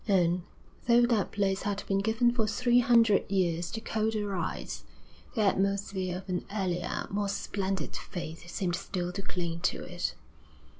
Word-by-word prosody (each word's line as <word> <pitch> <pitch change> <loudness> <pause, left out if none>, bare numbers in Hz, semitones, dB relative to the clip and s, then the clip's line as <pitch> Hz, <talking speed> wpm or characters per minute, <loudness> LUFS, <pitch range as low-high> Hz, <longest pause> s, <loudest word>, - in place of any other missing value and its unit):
And, 180 -3 +3 0.5
though 240 0 +6
that 230 -4 +1
place 195 -1 +1
had 200 -1 -2
been 195 0 +1
given 225 +4 +3
for 225 -3 +1
three 240 +3 +3
hundred 230 -4 +5
years 175 -3 +1
to 220 - -4
colder 220 -1 0
rites, 180 -4 -3 0.5
the 225 - +2
atmosphere 195 -2 +1
of 190 +1 -10
an 180 -1 -1
earlier, 180 -4 -1
more 205 0 0
splendid 195 -1 -2
faith 175 0 -6
seemed 175 -1 -1
still 180 0 -3
to 195 +2 -4
cling 170 -3 -3
to 190 - 0
it. 175 -1 -3
195 Hz, 155 wpm, -30 LUFS, 180-215 Hz, 0.5 s, though